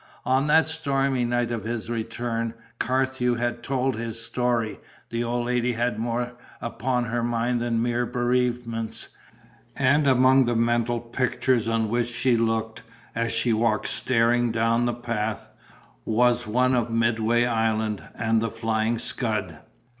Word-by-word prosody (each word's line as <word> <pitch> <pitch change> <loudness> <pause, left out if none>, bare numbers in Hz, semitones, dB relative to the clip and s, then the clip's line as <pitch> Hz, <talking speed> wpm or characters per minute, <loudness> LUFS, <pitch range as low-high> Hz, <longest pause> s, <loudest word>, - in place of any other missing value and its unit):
On 130 +3 +2
that 160 +2 +5
stormy 140 -5 0
night 120 0 0
of 115 -4 -3
his 115 0 -4
return, 115 0 -3 0.2
Carthew 130 -1 +1
had 120 0 -2
told 135 -1 0
his 115 0 -5
story; 115 -1 -1 0.3
the 115 0 -1
old 120 0 -1
lady 125 0 0
had 120 -1 -1
more 120 +1 -2 0.3
upon 125 +1 -1
her 120 0 -2
mind 120 +1 0
than 115 -1 0
mere 120 0 0
bereavements; 120 -2 -1 0.7
and 140 +2 +3
among 130 0 +5
the 120 0 0
mental 120 +1 +1
pictures 120 0 0
on 115 -1 +1
which 120 +2 0
she 125 +1 +1
looked, 115 -1 -1 0.3
as 115 0 -1
she 115 0 +2
walked 110 -1 +1
staring 120 -1 +2
down 115 +1 +2
the 120 - -1
path, 115 -3 -3 0.6
was 120 +1 +2
one 125 +4 +2
of 120 -2 +1
Midway 115 +1 +2
Island 110 -2 0
and 115 -1 +1
the 115 - -1
Flying 115 0 -1
Scud. 105 -8 -2
120 Hz, 145 wpm, -25 LUFS, 115-125 Hz, 0.7 s, that